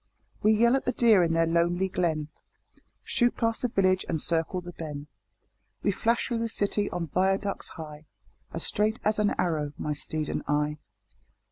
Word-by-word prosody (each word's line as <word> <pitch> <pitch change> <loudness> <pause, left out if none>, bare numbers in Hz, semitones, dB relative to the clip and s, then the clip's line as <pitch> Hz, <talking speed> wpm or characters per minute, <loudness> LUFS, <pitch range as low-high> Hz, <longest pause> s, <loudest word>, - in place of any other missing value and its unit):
We 215 - +5
yell 235 +3 +4
at 270 - -1
the 250 - 0
deer 225 -5 +5
in 165 -1 +2
their 165 0 +3
lonely 170 +3 +1
glen, 160 -5 -1 0.7
Shoot 240 0 +1
past 230 0 0
the 250 - +1
village 185 -4 +2
and 160 - 0
circle 165 +4 0
the 175 0 -8
Ben, 150 -4 -7 0.8
We - - +3
flash 230 +4 0
through 235 -3 -1
the 230 0 -1
city 205 -1 0
on 175 -1 -3
viaducts 195 +4 0
high, 155 -1 -9 0.4
As 165 - -4
straight 215 +2 +1
as 215 0 +1
an 210 -1 +2
arrow, 155 -4 -1
my 150 - -2
steed 155 +1 -3
and - - -2
I. 150 +1 0
180 Hz, 175 wpm, -27 LUFS, 160-215 Hz, 0.8 s, We